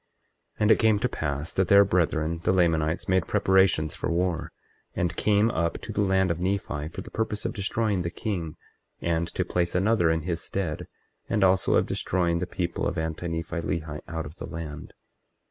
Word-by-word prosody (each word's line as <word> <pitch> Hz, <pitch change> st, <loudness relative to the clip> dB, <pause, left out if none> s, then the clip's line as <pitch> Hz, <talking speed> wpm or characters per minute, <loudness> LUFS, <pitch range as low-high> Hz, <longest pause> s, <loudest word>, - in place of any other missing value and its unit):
24:20 -, -, -12 dB
And 105 Hz, +1 st, +5 dB
it 110 Hz, -, +5 dB
came 110 Hz, -2 st, +4 dB
to 110 Hz, -, +1 dB
pass 75 Hz, 0 st, -3 dB
that 95 Hz, -2 st, +1 dB
their 100 Hz, +2 st, +7 dB
brethren, 85 Hz, -3 st, +1 dB
the -, -, +3 dB
Lamanites, 85 Hz, -3 st, +1 dB
made 95 Hz, -2 st, +2 dB
preparations 95 Hz, -6 st, +3 dB
for -, -, -3 dB
war, 85 Hz, -1 st, -1 dB, 0.4 s
and 85 Hz, -1 st, -1 dB
came 105 Hz, +2 st, +3 dB
up 85 Hz, +1 st, 0 dB
to -, -, -7 dB
the -, -, 0 dB
land 95 Hz, -2 st, +2 dB
of 85 Hz, -, -2 dB
Nephi 90 Hz, -6 st, -2 dB
for 80 Hz, -, -7 dB
the -, -, -11 dB
purpose 110 Hz, -1 st, -2 dB
of -, -, -1 dB
destroying 100 Hz, -1 st, 0 dB
the 85 Hz, -, -2 dB
king, 85 Hz, -4 st, -4 dB, 0.4 s
and 85 Hz, 0 st, 0 dB
to 90 Hz, -, -2 dB
place 90 Hz, -1 st, -1 dB
another 95 Hz, -2 st, +3 dB
in 80 Hz, 0 st, +1 dB
his 85 Hz, -1 st, -2 dB
stead, 90 Hz, -6 st, -3 dB, 0.4 s
and 105 Hz, -3 st, +2 dB
also 95 Hz, 0 st, +3 dB
of -, -, +3 dB
destroying 85 Hz, -2 st, 0 dB
the 90 Hz, -, -2 dB
people 90 Hz, -2 st, -2 dB
of 85 Hz, -, -3 dB
Anti 80 Hz, +2 st, -3 dB
Nephi 85 Hz, +1 st, -3 dB
Lehi 80 Hz, -3 st, -3 dB
out 80 Hz, -1 st, -4 dB
of 75 Hz, +5 st, -10 dB
the -, -, -6 dB
land. 80 Hz, -2 st, -7 dB
85 Hz, 195 wpm, -26 LUFS, 80-95 Hz, 0.4 s, their